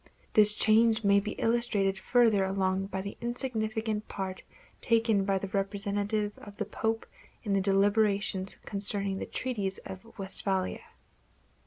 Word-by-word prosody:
This 210 -1 +7
change 225 +1 +3
may 200 0 +4
be 210 +1 -4
illustrated 225 -4 +1
further 225 -1 +3
along 190 0 -1
by 190 -1 -4
the 200 +1 -7
insignificant 220 -3 -2
part 190 -1 -5 0.4
taken 225 -4 +2
by 195 -1 +1
the 190 0 -5
representatives 205 +1 -1
of 205 -1 -12
the - - -2
Pope 225 0 -2 0.4
in 205 -4 -1
the 195 - +2
deliberations 200 0 +1
concerning 200 -1 -1
the - - -5
Treaties 205 -7 -3
of 190 +5 -11
Westphalia. 190 -1 +1
205 Hz, 135 wpm, -29 LUFS, 195-220 Hz, 0.4 s, This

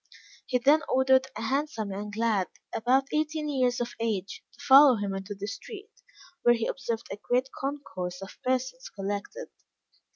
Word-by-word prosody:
He 255 - +2
then 285 +5 +4
ordered 265 0 +4
a - - -5
handsome 260 -4 -1
young 205 +2 -5
lad, 220 -5 +1 0.3
about 255 +4 +2
eighteen 305 0 0
years 255 -4 +1
of 240 - -3
age, 205 -5 -2
to - - -23
follow 275 -1 +9
him 205 -2 -3
into 195 +2 -5
the 200 +1 -5
street, 410 - -8 0.5
where 240 0 +5
he 230 -1 -2
observed 235 -4 -3
a 195 - -4
great 250 +5 0
concourse 185 -11 -4
of 195 - -11
persons 255 0 -1
collected. 205 - -5
245 Hz, 160 wpm, -28 LUFS, 205-270 Hz, 0.5 s, follow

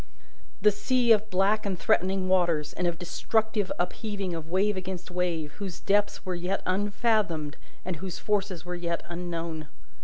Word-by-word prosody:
The 210 - +7
sea 245 +3 +2
of 215 -1 +5
black 200 +3 +3
and 195 -3 -1
threatening 185 +2 +2
waters, 170 -5 +2
and 180 - 0
of 170 -1 -1
destructive 210 +3 0
upheaving 195 +1 -2
of 165 -1 -5
wave 195 +4 +2
against 185 -1 -5
wave, 170 -4 -1
whose 190 -4 -5
depths 205 +1 +1
were 185 - -1
yet 180 +3 -2
unfathomed 200 -5 +1 0.3
and 180 -2 -2
whose 185 +2 -5
forces 195 -5 -1
were 180 - -4
yet 170 -1 -2
unknown. 170 -3 -4
185 Hz, 155 wpm, -28 LUFS, 175-205 Hz, 0.3 s, The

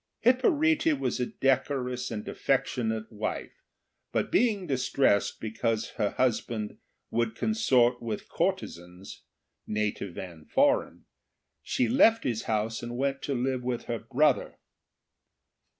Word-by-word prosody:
Hipparete 305 - +3
was 270 - -1
a 125 - 0
decorous 125 -2 0
and 105 -2 -5
affectionate 110 -2 -1
wife, 105 -1 -4 0.6
but - - -1
being 210 -4 +2
distressed 130 - +1
because 110 0 -1
her 105 -3 0
husband 115 -3 -1 0.3
would 115 -1 0
consort 125 - +2
with 110 -3 -4
courtezans, 90 +2 -3 0.5
native 105 -4 -2
and 85 -4 -9
foreign, 285 +1 +2 0.6
she 255 - 0
left 230 -3 +5
his 115 -3 -2
house 110 +1 -1
and 120 0 -5
went 135 +1 -1
to 140 - -2
live 130 +1 -1
with 125 -1 -2
her 115 -1 -3
brother. 135 +4 +1
125 Hz, 120 wpm, -28 LUFS, 110-145 Hz, 0.6 s, left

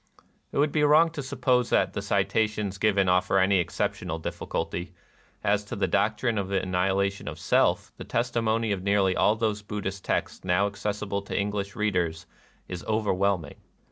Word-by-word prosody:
It - - -5
would 145 +1 +3
be 150 - +1
wrong 155 +3 +5
to 155 - -5
suppose 130 -2 +1
that - - +2
the - - -3
cita 110 -1 +1
tions 105 -2 -5
given 100 -2 +3
offer 90 +1 +3
any 95 0 +4
exceptional 80 -1 -2
difficulty. 85 +2 -4 0.5
As 105 0 +2
to - - -6
the 100 - +1
doctrine 110 +2 +1
of 95 - -2
the 95 0 +1
annihilation 95 +2 0
of - - -5
Self, - - +1
the - - -7
testimony 115 -2 0
of 100 -2 -1
nearly 100 -1 +2
all 105 - +3
those 110 -2 -1
Buddhist 100 -2 -5
texts - - -2
now 90 +2 +2
accessible 100 0 -3
to 100 - -5
English 100 0 -2
readers 90 -6 -1 0.4
is 90 -1 -6
overwhelming. 100 -6 0
100 Hz, 170 wpm, -27 LUFS, 95-110 Hz, 0.5 s, wrong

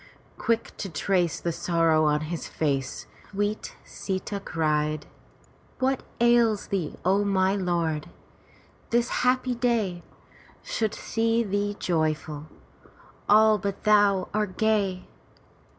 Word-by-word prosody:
Quick 230 0 -1
to 195 - -4
trace 175 +1 0
the 170 - -1
sorrow 165 -2 +2
on 150 0 +2
his 160 +2 -4
face, 135 -4 -2 0.2
sweet 205 +1 -2
Sita 195 +1 -4
cried: 155 -4 -1 0.4
" - - -27 0.3
What 265 0 +1 0.2
ails 235 -3 +3
thee, 185 -6 -2
my 195 0 +2
lord? 170 -5 -1 0.8
This 240 +1 +2
happy 255 0 +2
day 230 -7 0 0.6
Should 220 -2 -1
see 230 +1 0
thee 205 0 -1
joyful. 155 -2 -1 0.8
All 215 0 +6
but 200 +1 -4
thou 205 -3 +4
are 210 0 +1
gay. 200 -1 0
195 Hz, 110 wpm, -26 LUFS, 165-215 Hz, 0.8 s, All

